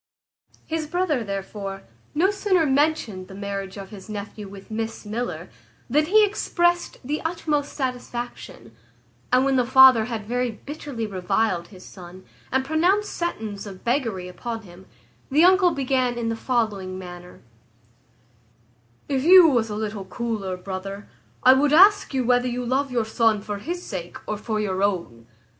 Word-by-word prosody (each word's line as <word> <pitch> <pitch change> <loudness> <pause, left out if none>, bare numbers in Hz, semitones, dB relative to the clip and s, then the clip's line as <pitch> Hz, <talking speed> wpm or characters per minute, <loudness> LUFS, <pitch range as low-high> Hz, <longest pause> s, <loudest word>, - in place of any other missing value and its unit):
His 320 -1 -3
brother, 315 -6 0
therefore, 195 -1 -5 0.3
no 365 +6 +3
sooner 395 -4 +2
mentioned 270 -10 0
the 190 - -11
marriage 200 -1 -5
of 195 -1 -8
his 200 0 -11
nephew 205 0 -6
with 195 +2 -12
Miss 225 0 -4
Miller, 230 +4 -4 0.4
than 300 +5 +2
he 425 +4 +6
exprest 350 -4 0
the 295 +4 -2
utmost 310 -3 -2
satisfaction; 245 - -5 0.6
and 255 +1 +4
when 270 -1 +2
the 250 - +3
father 260 -2 +7
had 225 -3 -5
very 245 +2 -1
bitterly 275 0 -6
reviled 185 -1 -1
his 185 -3 -14
son, 185 0 -12 0.3
and 265 0 +1
pronounced 360 +8 +2
sentence 220 - -4
of 190 -2 -10
beggary 230 -8 -1
upon 225 +5 -6
him, 185 0 -15 0.4
the 300 +4 +4
uncle 370 0 +6
began 260 -5 0
in 230 -1 -1
the 225 - -1
following 215 -7 -1
manner: 180 -1 -10 1.7
"If 265 -2 0
you 360 +1 +9
was 235 -5 +1
a 210 - -4
little 210 -2 -4
cooler, 200 -3 -3
brother, 195 +2 -6 0.4
I 255 - +8
would 285 +2 +2
ask 400 +5 +6
you 265 -2 0
whether 245 +1 +3
you 245 0 -3
love 265 +3 0
your 235 -3 0
son 220 -1 +2
for 205 -1 -4
his 350 - -5
sake 175 -4 -6
or 215 - -1
for 215 +1 -3
your 195 -2 -1
own. 170 - -2
230 Hz, 155 wpm, -24 LUFS, 200-285 Hz, 1.7 s, you